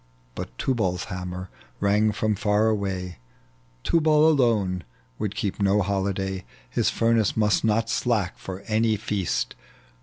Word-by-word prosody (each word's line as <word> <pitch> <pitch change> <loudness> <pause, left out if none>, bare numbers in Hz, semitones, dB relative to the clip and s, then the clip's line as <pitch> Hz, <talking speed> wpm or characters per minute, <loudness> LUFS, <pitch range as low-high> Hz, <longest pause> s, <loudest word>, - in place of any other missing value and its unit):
But - - -7
Tubal's 95 -9 0
hammer 90 0 -5 0.3
rang 105 +2 +3
from 110 +1 0
far 105 +2 +2
away, 95 - -2 0.6
Tubal 155 -2 +4
alone 110 - +2 0.4
would 105 -1 -2
keep 105 -3 -2
no 100 +1 +3
hoHday, 95 0 -1 0.2
His - - +1
furnace 115 -2 +2
must 105 -1 +2
not 115 +1 +2
slack 110 -6 0
for 95 0 -7
any 110 +1 +1
feast. 100 - -1
105 Hz, 125 wpm, -25 LUFS, 95-110 Hz, 0.6 s, Tubal